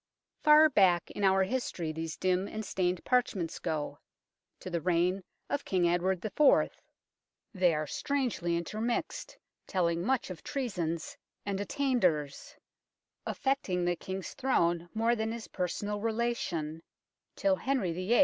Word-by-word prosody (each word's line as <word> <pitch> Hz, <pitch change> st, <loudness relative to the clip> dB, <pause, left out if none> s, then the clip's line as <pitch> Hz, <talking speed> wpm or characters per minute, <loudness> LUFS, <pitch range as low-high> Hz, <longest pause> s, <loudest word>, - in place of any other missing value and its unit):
Far 305 Hz, 0 st, +8 dB
back 190 Hz, -, +3 dB
in 205 Hz, -, -4 dB
our 190 Hz, 0 st, +5 dB
history 190 Hz, -7 st, -2 dB
these 160 Hz, 0 st, -5 dB
dim 185 Hz, +1 st, +1 dB
and 220 Hz, 0 st, -5 dB
stained 180 Hz, -2 st, -1 dB
parchments 210 Hz, -9 st, 0 dB
go, 155 Hz, -3 st, -3 dB, 0.6 s
to 185 Hz, -, -7 dB
the 170 Hz, -1 st, -1 dB
reign 180 Hz, +2 st, +1 dB, 0.2 s
of 285 Hz, -, -2 dB
King 180 Hz, -2 st, +2 dB
Edward 175 Hz, +2 st, +1 dB
IV. 280 Hz, +7 st, +4 dB, 0.8 s
They 180 Hz, -4 st, +3 dB
are 155 Hz, 0 st, -1 dB
strangely 235 Hz, -, -1 dB
intermixed, 215 Hz, +7 st, -3 dB, 0.3 s
telling 170 Hz, -3 st, +1 dB
much 255 Hz, -2 st, 0 dB
of 170 Hz, -, -8 dB
treasons 180 Hz, -, -3 dB, 0.3 s
and 200 Hz, -1 st, -2 dB
attainders, 190 Hz, -, 0 dB, 0.7 s
affecting 205 Hz, -10 st, 0 dB
the 175 Hz, 0 st, +1 dB
King's 190 Hz, +1 st, -6 dB
Throne 175 Hz, -10 st, +1 dB
more 230 Hz, +2 st, +2 dB
than 220 Hz, 0 st, -2 dB
his 230 Hz, -1 st, -6 dB
personal 205 Hz, +3 st, -2 dB
relation, 215 Hz, -9 st, -2 dB, 0.5 s
till 290 Hz, -1 st, +2 dB
Henry 255 Hz, -10 st, 0 dB
VIII. 185 Hz, +8 st, +1 dB
190 Hz, 130 wpm, -31 LUFS, 170-235 Hz, 0.8 s, Far